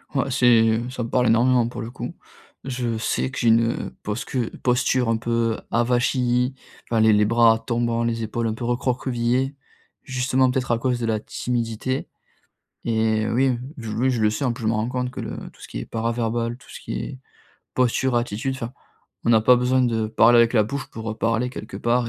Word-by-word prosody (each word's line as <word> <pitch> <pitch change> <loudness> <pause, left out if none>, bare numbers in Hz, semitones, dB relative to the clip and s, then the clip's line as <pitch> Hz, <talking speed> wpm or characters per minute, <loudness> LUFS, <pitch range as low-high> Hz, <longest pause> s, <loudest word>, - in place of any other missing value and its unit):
Ouais, 135 0 0
c'est 115 -2 +4
ça 125 -1 -4
me 115 - -5
parle 125 -1 +2
énormément, 120 +1 +4
pour 120 - -6
le 115 - -6
coup. - - -6 0.5
Je 125 -3 -2
sais 115 - -1
que 130 - -8
j'ai 120 - +2
une 115 +1 +5
heu, - - -6
posque 105 +6 -5 0.3
posture 125 0 +2
un 115 0 +2
peu 115 -1 0
avachie, 125 +1 +1 0.3
enfin 115 -1 +1
les 110 0 +5
les 105 0 +4
bras 115 0 +4
tombants, 115 0 -1
les 115 -1 -1
épaules 115 +1 -2
un 110 - -2
peu 120 - -5
recroquevillées, 125 +2 0 0.5
justement 130 0 +1
peut-être 125 -1 -1
à 115 - +2
cause 125 0 0
de 115 - -2
la 110 -1 0
timidité. 120 +3 -3 0.8
Et 110 -1 +1
heu, - - -1
oui, 130 0 +2 0.2
oui, 115 +1 -1
je 120 -3 -1
le 105 - +4
sais, 110 +6 -3
en 125 - +2
plus, 120 0 -7
je - - 0
me 110 - +2
rends 110 +2 -1
compte 125 -1 -2
que - - -6
le - - -6
tout - - -21
ce - - -10
qui - - -5
est - - -5
para-verbal, 115 +1 -2
tout 125 - -20
ce - - -10
qui - - -6
est 130 - -7 0.6
posture, 130 0 +1
attitude, 120 +2 -1
enfin, 120 -2 -6 0.5
on 115 - +4
n'a 110 -1 +5
pas 125 +2 +6
besoin 125 +1 +2
de 115 -3 +1
parler 115 +2 +5
avec 115 +1 +4
la 110 - +5
bouche 140 +7 -4
pour 110 0 -5
heu, - - -4
parler, 115 +2 0
quelque - - -8
part 120 0 +1
120 Hz, 210 wpm, -23 LUFS, 115-125 Hz, 0.8 s, pas